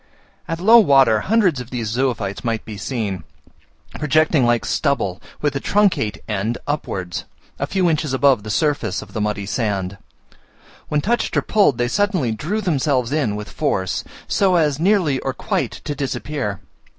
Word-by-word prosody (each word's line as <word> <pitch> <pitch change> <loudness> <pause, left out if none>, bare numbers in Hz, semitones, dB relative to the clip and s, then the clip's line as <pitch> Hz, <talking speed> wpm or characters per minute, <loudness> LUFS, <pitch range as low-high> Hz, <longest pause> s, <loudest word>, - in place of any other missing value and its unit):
At 165 -1 -3
low 225 +6 +7
water 135 - +5
hundreds 185 - +2
of 125 - -10
these 120 -4 -3
zoophytes 115 -4 -1
might 115 -2 -2
be 110 - -7
seen, 100 - -3 0.8
projecting 155 -3 +3
like 120 -1 +2
stubble, 120 - 0 0.2
with 145 -2 +1
the 135 - -2
truncate 190 - +1
end 105 +3 -1
upwards, 95 - -3 0.3
a - - -1
few 190 -2 +1
inches 155 -3 0
above 135 -3 +3
the 110 - -8
surface 145 +6 0
of - - -16
the 110 - -2
muddy 105 -1 -1
sand. 100 -2 -2 0.9
When 150 -1 0
touched 235 +8 0
or - - +2
pulled 200 - +3
they 120 - +1
suddenly 185 - +1
drew 165 - -2
themselves 140 - 0
in 145 -9 0
with 105 0 -7
force, 95 - -1 0.2
so 190 -2 +2
as 150 -4 +2
nearly 175 -7 +2
or 135 - -3
quite - - -1
to 145 - -3
disappear. 135 -6 -3
135 Hz, 160 wpm, -20 LUFS, 110-155 Hz, 0.9 s, low